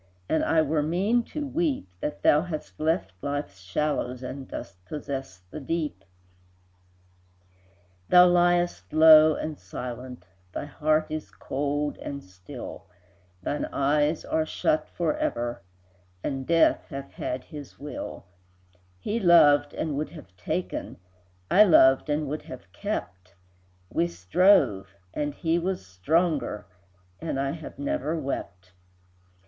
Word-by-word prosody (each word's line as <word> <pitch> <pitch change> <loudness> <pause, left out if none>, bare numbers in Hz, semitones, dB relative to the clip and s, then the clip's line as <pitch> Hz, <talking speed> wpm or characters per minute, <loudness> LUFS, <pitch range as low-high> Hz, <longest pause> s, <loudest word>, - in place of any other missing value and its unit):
And 160 - +1
I 160 -1 +3
were 155 0 +1
mean 190 +10 +1
to 300 -1 -4
weep, 295 - -1
That 150 - -4
thou 150 - +5
hast 165 -3 -6
left 160 - 0
Life's 140 -9 -4
shallows, 125 +5 -2
And 130 +1 -6
dost 90 -2 -8
possess 135 -5 -6
the - - -6
Deep. 150 - -3 2.1
Thou 180 0 +8
liest 175 0 +2
low 155 0 +8
and 155 -1 -5
silent, 125 +4 -7 0.3
Thy - - -4
heart 155 +2 +1
is 155 -9 -4
cold 145 +8 -2
and 140 0 -6
still, 90 -1 -10 0.6
Thine 145 - -1
eyes 150 +3 +1
are 160 - +1
shut 155 0 0
forever, 120 - -2 0.6
And 135 -2 -3
Death 165 -1 +3
hath 140 -1 -7
had 125 0 -4
his 145 -3 -10
will; 145 +1 -7 0.7
He 210 - -2
loved 150 -6 +6
and 155 -3 -2
would 150 - -2
have 120 - -13
taken, 90 - -4 0.5
I 205 - +8
loved 135 -7 +5
and 150 0 0
would 150 +3 -3
have 95 -8 -11
kept, 100 - -5 0.6
We 85 - +1
strove, 95 - +3 0.2
and 145 -1 -2
he 165 0 +1
was 185 - -3
stronger, 140 - 0 0.5
And 155 -4 -3
I 135 0 0
have 160 0 -8
never 285 - -2
wept. 90 - -5
150 Hz, 125 wpm, -26 LUFS, 125-165 Hz, 2.1 s, Thou